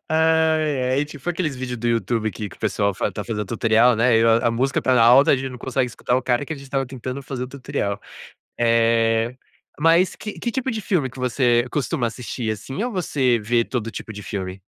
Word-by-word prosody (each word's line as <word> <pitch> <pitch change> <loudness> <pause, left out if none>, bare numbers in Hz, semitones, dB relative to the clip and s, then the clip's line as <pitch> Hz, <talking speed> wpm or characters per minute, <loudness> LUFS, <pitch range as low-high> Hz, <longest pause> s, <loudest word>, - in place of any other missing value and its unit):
Ai, 160 -4 +2
ai. 140 +3 +2
Tipo 145 +1 -9
aqueles 165 -5 -2
vídeo 125 -1 -4
do 120 +1 -4
YouTube 115 -1 0
que 105 +2 -6
que - - -15
o - - -30
pessoal 100 -1 0
fa - - -1
está 105 - -6
fazendo 105 -2 -3
tutorial, 115 +2 +3
né, 115 0 +4
e - - +3
a 115 +1 +4
a - - +1
música 130 +4 0
está 125 0 +3
alta, 130 +6 +6
gente 130 0 -4
não 125 - -9
consegue 125 -1 -1 0.2
o 125 +1 +3
cara, 125 +2 0
que 150 - -5
a - - -5
gente 140 - -11
estava 135 0 -2
tentando 130 +1 -6
fazer 130 -1 -5
o - - -9
tutorial. 130 -7 -3 0.6
Eh, 115 0 +2 0.4
mas 165 +4 +4
que 210 - -7
que 235 - -2
tipo 265 +1 -2
de 220 -1 -3
filme 170 -9 0
que 130 - -12
você 125 -1 +2
costuma 130 -4 -1
assistir, 115 -1 -4
assim, 125 - -5
ou 245 - -2
você 140 - +1
vê 115 +2 +1
todo 115 -2 -4
tipo 110 - -7
de 105 0 -8
filme? 95 -1 -5
125 Hz, 220 wpm, -22 LUFS, 115-140 Hz, 0.6 s, alta